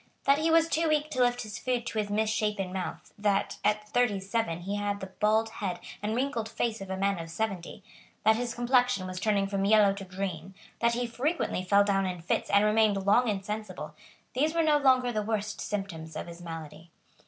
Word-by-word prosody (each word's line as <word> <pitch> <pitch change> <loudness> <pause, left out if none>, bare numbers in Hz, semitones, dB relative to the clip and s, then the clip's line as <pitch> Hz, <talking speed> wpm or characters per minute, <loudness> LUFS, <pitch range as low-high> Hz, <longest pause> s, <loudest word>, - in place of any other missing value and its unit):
That 275 +1 +4
he 320 +1 +1
was 325 0 +5
too 330 0 +1
weak 305 0 +1
to 260 - -3
lift 245 0 +2
his 215 0 -7
food 250 -2 -1
to 220 - -2
his 205 -1 -1
misshapen 210 -3 0
mouth, 190 -1 -5
that, 205 -1 0
at 210 0 +1
thirty 220 -4 +2
seven, 195 -3 -2
he 200 +3 -3
had 205 0 -2
the 190 - -5
bald 215 +3 +1
head 180 -3 -2 0.2
and 215 +2 -1
wrinkled 245 -4 -1
face 225 -1 -2
of 195 - -7
a 190 - -3
man 195 -1 +1
of 165 0 -6
seventy, 195 0 -4 0.4
that 220 +1 +5
his 235 0 -3
complexion 245 -4 +2
was 185 0 -5
turning 205 -2 +2
from 195 0 -1
yellow 205 -1 +5
to 200 0 -7
green, 185 -1 -5 0.2
that 235 0 +3
he 245 0 -1
frequently 250 - -1
fell 200 +2 +5
down 195 -1 +1
in 180 -1 -4
fits 165 - -1
and 200 +1 +4
remained 210 -2 +3
long 240 +5 +4
insensible, 200 -6 -4 0.4
these 305 +5 +1
were 330 - +3
no 300 -2 +4
longer 255 -3 +4
the 215 -2 -1
worst 210 -1 -2
symptoms 170 -6 -5
of - - -4
his 170 0 -10
malady. 165 -1 -8
210 Hz, 210 wpm, -29 LUFS, 195-240 Hz, 0.4 s, was